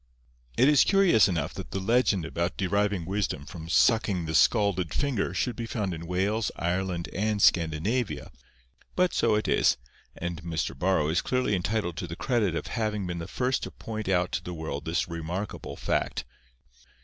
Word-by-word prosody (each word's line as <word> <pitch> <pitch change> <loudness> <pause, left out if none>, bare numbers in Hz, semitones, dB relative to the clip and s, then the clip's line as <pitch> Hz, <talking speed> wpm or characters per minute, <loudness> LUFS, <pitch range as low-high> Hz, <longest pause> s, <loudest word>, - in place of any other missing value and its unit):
It 130 - +5
is 150 -2 +6
curious 195 - +5
enough 85 -6 -2
that - - -7
the 95 - -3
legend 100 -4 +2
about 85 +2 -2
deriving 100 -1 0
wisdom 95 -6 -2
from 80 0 -9
sucking 100 -3 +3
the 80 - -3
scalded 95 -3 +3
finger 135 -11 0
should 115 +7 -1
be 115 0 -5
found 105 -5 -2
in 85 0 -7
Wales, 100 +5 0
Ireland, 90 0 -2
and 105 +2 0
Scandinavia. 90 +8 +1 0.6
But 180 -1 +2
so 115 -2 +3
it 105 - 0
is, - - +3 0.4
and 85 -1 -4
Mr. 80 -4 -3
Borrow 85 0 +1
is 85 +3 +2
clearly 125 -4 0
entitled 90 -2 -1
to 90 - -4
the 85 - -6
credit 105 -5 0
of - - -3
having 105 -4 -2
been 85 -1 -4
the 85 - -5
first 125 0 0
to - - -4
point 110 -2 -6
out 90 -1 +2
to - - -2
the 90 - -6
world 80 -2 -5
this 80 +1 0
remarkable 85 +4 -5
fact. - - -1
95 Hz, 175 wpm, -27 LUFS, 85-110 Hz, 0.6 s, is